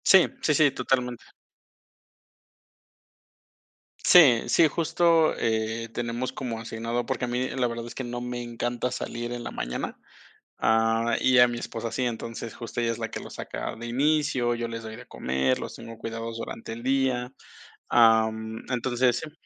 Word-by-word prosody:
Sí, 190 -2 +7
sí, 150 - +2
sí, 145 -2 +5
totalmente. 125 -2 -1 2.8
Sí, 140 -10 +7
sí, 160 +7 +5
justo, 165 +1 +3
eh, 110 0 -1
tenemos 120 +1 -3
como 120 -4 -4
asignado, 115 +1 -3
porque 125 - -2
a - - -5
mí 125 +1 -1
la 125 -2 0
verdad 115 0 -5
es 120 - -8
que 130 - -4
no 120 0 -4
me 125 0 -4
encanta 120 +1 -3
salir 120 -1 -4
en 120 0 -5
la - - -5
mañana, 60 +1 -4 0.6
ah, 115 +1 +2
y 130 -1 +4
a 125 - +8
mi 120 -1 -4
esposa 115 -1 -5
sí, 125 +2 -1
entonces, 115 -1 -5
justo 120 0 -4
ella 115 0 +1
es 115 - -4
la 115 -1 -4
que - - -4
lo - - -9
saca - - -5
de 115 +1 -7
inicio, 135 -1 +1
yo 120 0 -3
les 115 0 -6
doy 110 0 -7
de - - -11
comer, 65 0 0
los - - -6
tengo 115 0 -10
cuidados 115 0 -5
durante 115 0 -6
el 115 - -8
día, 130 -1 0 0.6
am, 110 -1 +3
entonces, 125 0 +1
si 155 - -8
120 Hz, 170 wpm, -26 LUFS, 115-125 Hz, 2.8 s, a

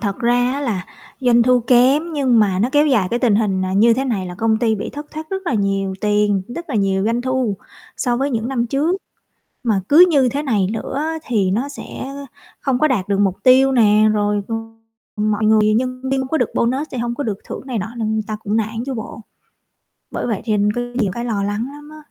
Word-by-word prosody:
thật 200 -1 -2
ra 245 +1 +2
á 280 - -3
là 210 -9 -2 0.4
doanh 240 -2 +4
thu 250 0 +3
kém 260 +7 +3
nhưng 265 -6 +2
mà 195 -4 +2
nó 220 +5 +2
kéo 295 +1 +4
dài 220 -10 +2
cái 235 - 0
tình 235 -5 +3
hình, 195 -4 0
à, 185 - -3
như 225 +4 +4
thế 265 +3 -1
này 210 -8 -2
là 180 - -7
công 220 +3 +1
ty 225 -1 +1
bị 205 - -5
thất 295 +1 -8
thoát 315 0 -8
rất 385 0 -3
là 275 - 0
nhiều 195 -2 0
tiền, 210 -2 +1
đất 335 +8 -7
là - - -3
nhiều 195 -2 +1
doanh 230 +2 0
thu 255 -6 -1 0.4
so 245 -3 0
với 275 +3 -1
những 230 -1 -2
năm 245 -3 -1
trước. 295 +9 0 0.7
Mà 210 -5 +1
cứ 330 +5 +8
như 275 -6 +3
thế 285 +4 -3
này 210 -9 +1
nữa 220 -1 -5
á 315 +3 -2
thì 205 -6 +1
nó 245 +8 -1
sẽ, 285 - -9
ơ, 280 +1 -8 0.3
không 265 -3 0
có 310 - +4
đạt 220 -9 -1
được 200 -1 0
mục 195 -2 +2
tiêu 260 +1 +6
nè, 215 -4 +4
rồi 205 -1 0
c - - -9 0.7
mọi 215 0 +1
người 215 0 +4
nhân 255 +2 -1
viên 270 - +1
không 265 - -4
có 320 - 0
được - - 0
bonus 260 +6 0
sẽ 255 - -5
hông 235 0 -2
có 285 - -3
được 210 -5 -2
thưởng - - -6
này 245 -4 -2
nọ 225 +5 -5
nên 220 -1 -1
ta 215 - -3
cũng 210 +2 0
nản 225 +1 -2
chứ 270 - -3
bộ. 225 -1 -7 0.9
Bởi - - -3
vậy 225 -5 -2
thêm 210 -2 +1
có 245 - -1
nhiều 220 -6 0
cái 235 - -4
lo 220 -4 -1
lắng 205 +4 -2
lắm 295 +1 -12
á. 310 - -12
235 Hz, 245 wpm, -19 LUFS, 210-265 Hz, 0.9 s, cứ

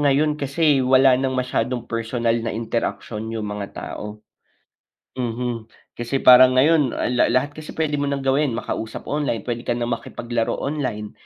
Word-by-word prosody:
ngayon 150 +1 +2
kasi, 140 0 +2
wala 130 +1 +5
ng 130 -1 -1
masyadong 125 -1 -1
personal 115 0 -1
na 115 - -3
interaksyon 110 -1 -3
yung 110 -1 -4
mga 100 -1 -5
tao. 105 0 -7 1.0
Mhm. 120 -1 -3 0.3
Kasi 120 +3 -3
parang 130 0 +8
ngayon, 145 -1 +3
ah, 125 - -1
la 125 - +3
lahat 140 +3 +1
kasi 155 +1 -10
puwede 150 -2 0
mo 145 - 0
nang 140 -1 -2
gawin, 135 -2 +1
makausap 110 -1 -5
online, 140 -8 -2
puwede 120 -1 -3
ka 120 - +1
na 120 - -2
makipaglaro 120 0 -2
online, 130 -8 -3
125 Hz, 160 wpm, -22 LUFS, 115-140 Hz, 1.0 s, parang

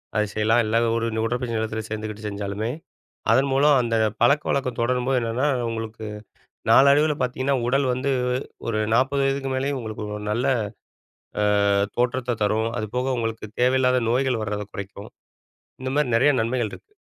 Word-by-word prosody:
அத 105 - +3
செய்யலாம். 110 +2 +3
இல்ல 110 - -1 0.2
ஒரு, 115 0 0
ஒரு 110 - 0
உடற்பயிற்சி 120 0 -2
நிலையத்தில 110 0 -2
சேர்ந்துக்கிட்டு 110 0 -5
செஞ்சாலுமே, 100 +2 -3 0.6
அதன் 135 +1 +3
மூலம் 140 +1 +5
அந்த 115 -1 -1 0.3
பழக்கவழக்கம் 135 -1 +2
தொடரும்போது 125 +2 +1
என்னன்னா, 115 +5 0 0.2
உங்களுக்கு 110 -1 -5 0.6
நாளடைவில 145 +2 +5
பாத்தீங்கன்னா, 130 +2 0
உடல் 135 +1 +2
வந்து 130 +2 -1 0.6
ஒரு 110 -1 0
40 135 +3 +2
வயதுக்கு 135 0 -1
மேலேயும் 135 +1 -1
உங்களுக்கு 110 -1 -6
ஒரு 105 - -8
நல்ல 120 +5 0 1.2
அ, - - +4 0.3
தோற்றத்த 125 -1 0
தரும். 110 +2 +1
அதுபோக 125 +5 -2
உங்களுக்கு 115 -1 -3
தேவையில்லாத 125 0 +3
நோய்கள் 125 -2 +1
வர்றத 105 0 -3
குறைக்கும், 100 +1 -8 0.7
இந்தமாரி 130 -1 0
நிறைய 145 +4 +4
நன்மைகள் 115 -1 -1
இருக்கு. 420 - -13
120 Hz, 140 wpm, -24 LUFS, 110-135 Hz, 1.2 s, மூலம்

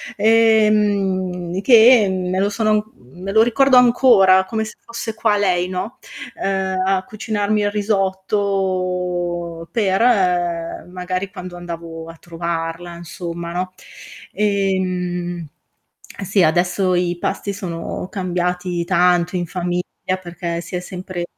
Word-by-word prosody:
Ehm 205 -5 +2
che 235 -2 +7
me 185 0 -1
lo 200 +1 +2
sono 215 +1 0
me 175 +11 -9
lo 220 +2 +5
ricordo 255 +2 +4
ancora 230 -7 +5
come 220 +1 -2
se 215 - -8
fosse 230 -1 -6
qua 215 -1 +1
lei, 180 -3 +1
no, 190 +7 -4 0.4
uh 190 -1 -1
a 190 -1 +1
cucinarmi 215 -1 -1
il 205 0 0
risotto 185 -4 -1
per 200 -3 +1 0.9
magari 185 +1 -4
quando 180 -1 -8
andavo 165 -2 -7
a 165 - -10
trovarla 170 0 -4
insomma, 170 0 -6
no? 185 +1 -3 0.6
Ehm 180 -4 -1 0.8
sì 195 -1 +2
adesso 180 +3 +2
i 175 -1 0
pasti 200 +3 -2
sono 180 -2 -5
cambiati 180 -1 -2
tanto 180 0 +2
in 175 -1 -2
famiglia 180 0 -2 0.4
perché 170 -1 -4
si 175 +2 -7
è - - -1
sempre 180 -1 -6
185 Hz, 120 wpm, -20 LUFS, 175-205 Hz, 0.9 s, che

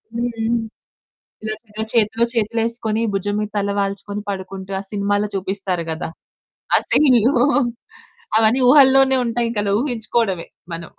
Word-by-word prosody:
హ్మ్. 235 -1 -1 0.9
నిజంగా 215 0 -5
చేతిలో 225 0 +2
చేతులేసుకొని 225 0 -1
భుజం 205 +1 -1
మీద 210 0 -2
తలవాల్చుకొని 200 0 -2
పడుకుంటూ, 190 0 -6
ఆ - - -4
సినిమాలో 205 0 0
చూపిస్తారు 190 -2 -2
గదా! 160 0 -4 0.7
ఆ - - +7
సీన్లు 255 -3 +4 1.0
అవన్నీ 225 +4 +3
ఊహల్లోనే 270 -1 +6
ఉంటాయింకలా 230 -3 -1
ఊహించుకోవడమే 225 -8 -1 0.3
మనం. 165 0 -6
215 Hz, 105 wpm, -20 LUFS, 200-235 Hz, 1.0 s, ఆ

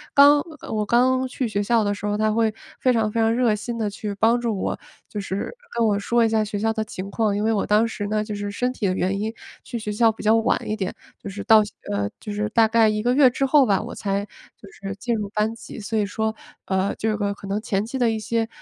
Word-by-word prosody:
刚 285 +1 +8 0.2
呃 - - -8
我 215 -1 0
刚 255 +4 +2
去 255 0 -2
学 205 -2 -1
校 225 +2 +2
的 205 0 0
时 205 0 -5
候 205 0 0
她 215 0 +2
会 225 0 +2 0.3
非 255 - +3
常 225 -3 +1
非 230 - 0
常 225 0 +3
热 240 -2 +2
心 230 +3 -4
地 220 -2 -1
去 205 0 -5
帮 230 +4 +3
助 230 -4 -1
我， - - -2 0.3
就 210 - -5
是 200 - -4 0.2
跟 230 - +3
我 205 -2 +2
说 235 +3 +2
一 - - +2
下 220 -1 +2
学 210 -1 -4
校 225 +2 0
的 220 -1 -1
情 195 -2 -7
况。 215 -1 +1
因 205 - -1
为 225 +1 +2
我 205 - 0
当 215 +2 +3
时 205 -2 -4
呢 215 +1 0
就 210 0 -5
是 205 0 -4
身 250 +5 -1
体 215 -5 -1
的 185 - +1
原 190 +1 -1
因， 220 +2 -2 0.3
去 240 - -5
学 215 -2 -4
校 225 +2 +4
比 220 - -10
较 220 +1 +5
晚 225 0 +2
一 215 - -1
点， 190 -4 -3 0.3
就 - - -6
是 200 +1 -6
到 220 -1 +6
校 210 - -8 0.2
呃， 100 0 -1
就 210 - -7
是 210 +1 -1
大 225 0 +4
概 225 0 +4
1 215 0 -1
个 245 +1 +2
月 265 -1 +6
之 270 +2 -1
后 275 0 +5
吧， 200 -5 +2
我 - - -7
才 200 0 -2 0.3
就 200 - -14
是 195 0 -7
进 235 +3 -2
入 210 -2 -3
班 215 +1 0
级。 230 - -10
所 220 +1 -3
以 210 - +2
说， 220 +2 -2 0.3
呃， 190 +1 0
这 220 0 -1
个 200 -1 -1
可 200 - -11
能 200 +2 -1
前 200 -2 -1
期 250 +4 -5
的 240 -2 +3
一 225 - -1
些 225 +1 -1
215 Hz, 295 characters per minute, -23 LUFS, 205-230 Hz, 0.3 s, 刚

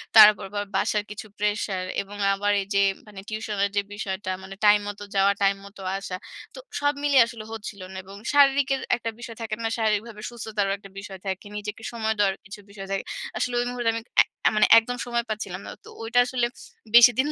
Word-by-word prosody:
তার 215 -1 +12
উপর 200 - -9
আবার 205 0 -2
বাসার 210 -1 +1
কিছু 215 +1 -7
প্রেশার 205 -2 -1 0.2
এবং 205 +1 -10 0.2
আবার 205 +1 0
এইযে 200 +1 0 0.3
মানে 205 -2 -10
tuition 215 -1 -4
এর - - -1
যে 205 - +3
বিষয়টা 190 -2 -4
মানে 195 0 -9
টাইম 210 0 +7
মত 205 0 -6 0.2
যাওয়া, 195 +1 +5
টাইম 195 0 +4
মত 200 +1 -14 0.2
আসা। 195 -2 -5 0.4
তো - - -8 0.2
সব 290 0 +2
মিলিয়ে 280 -3 +6
আসলে 230 -2 -8
হচ্ছিলো 205 -3 -7
না 190 - -8
এবং 195 +1 -12 0.2
শারীরিকের 275 -1 +4
একটা 230 -1 -4
বিষয় 235 -1 -8
থাকে 220 -1 -3
না? 225 - +1
শারীরিকভাবে 215 0 -1
সুস্থতারও 215 -4 -2
একটা 195 0 -14
বিষয় 195 -1 -9
থাকে। 190 +1 -3
নিজেকে 210 +2 -6
সময় 220 -1 0
দেওয়ার 195 -2 +3
কিছু 205 +1 -9
বিষয় 195 -1 -9
থাকে। 195 - -1 0.3
আসলে 250 - -1
ঐ - - +3
মুহূর্তে 240 -2 0
আমি 230 - -4 0.4
অ্যা - - +5
মানে 215 - +5
একদম 245 +2 -5
সময় 240 -1 -1
পাচ্ছিলাম 200 -3 -4
না। - - -6
তো - - -11
ঐটা 230 +2 +2
আসলে 245 -1 0 0.5
বেশিদিন 245 +3 +7
210 Hz, 200 wpm, -25 LUFS, 200-230 Hz, 0.5 s, তার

